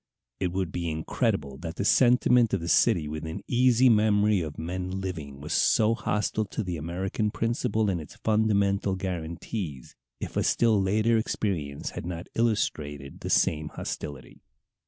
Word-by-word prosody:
It 90 - -1
would 95 -2 -2
be 85 -1 -2
incredible 80 - -1
that 80 0 -6
the 100 - -2
sentiment 125 -2 +4
of - - -2
the 85 - -4
city 80 -1 +3
within 80 +2 -5
easy 125 0 +4
memory 105 -3 +4
of 75 -3 -6
men 90 +3 -4
living 80 -8 -6
was 75 +2 -4
so 110 +1 +3
hostile 110 -1 -1
to 110 - -4
the 90 -2 -3
American 90 +6 -2
principle 110 -1 0
and 90 -4 0
its 75 - -12
fundamental 100 -3 +1
guarantees 85 - -5 0.2
if - - -6
a - - +2
still 110 -4 +3
later 110 +4 +2
experience 80 -10 -2
had - - -6
not 85 -1 -6
illustrated 75 -11 -1
the - - -5
same 75 -1 +2
hostility. 70 -4 -7
95 Hz, 155 wpm, -27 LUFS, 80-110 Hz, 0.2 s, sentiment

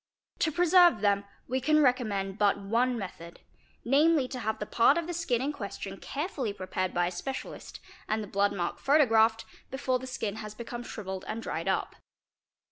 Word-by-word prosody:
'To 315 - +2
preserve 350 - +5
them 200 -1 +2 0.2
we 260 +1 -1
can 305 +3 +3
recommend 215 -8 +1
but 205 -1 +3
one 235 +5 +1
method; 170 -4 -8 0.4
namely 285 +2 +4
to 255 - -6
have 220 -2 -2
the 210 - -4
part 235 +8 +4
of 335 - -1
the 350 - -4
skin 270 -8 0
in 285 - 0
question 200 -4 -6
carefully 280 - -3
prepared 185 -1 -3
by 175 0 +1
a 175 - -2
specialist, 265 +10 -6 0.3
and 215 0 0
the - - -8
blood 200 +1 +1
mark 175 -3 -3
photo 295 +1 +4
graphed, 225 -1 +3 0.2
before 260 -1 -1
the 260 - -8
skin 220 -4 -3
has 215 -1 -7
become 240 +1 -6
shrivelled 190 -5 -6
and 225 +1 -4
dried - - -4
up. - - -1
230 Hz, 185 wpm, -29 LUFS, 200-270 Hz, 0.4 s, preserve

